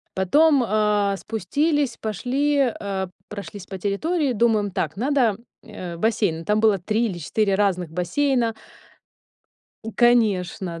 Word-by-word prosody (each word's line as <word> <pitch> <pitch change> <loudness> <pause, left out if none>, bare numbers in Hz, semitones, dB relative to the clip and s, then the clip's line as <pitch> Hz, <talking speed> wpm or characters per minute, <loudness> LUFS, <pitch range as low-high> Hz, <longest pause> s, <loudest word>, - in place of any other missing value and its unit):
Потом, 280 - +4
э, 210 -2 +1
спустились, 285 - -1
пошли, 260 +7 -1 0.2
э, 195 -2 -3 0.2
прошлись 200 -2 -8
по 190 - -6
территории, 275 - -1
думаем: 215 -3 +1
"Так, 160 0 -3
надо, 245 -4 +1 0.3
э, 180 -6 -8
бассейн". 200 -5 0
Там 210 +1 +2
было 215 -2 +4
3 215 +6 0
или 190 -6 -3
4 200 +6 0
разных 190 -4 0
бассейна. 230 - 0 1.4
Конечно, 195 -7 +2
210 Hz, 115 wpm, -23 LUFS, 190-240 Hz, 1.4 s, Потом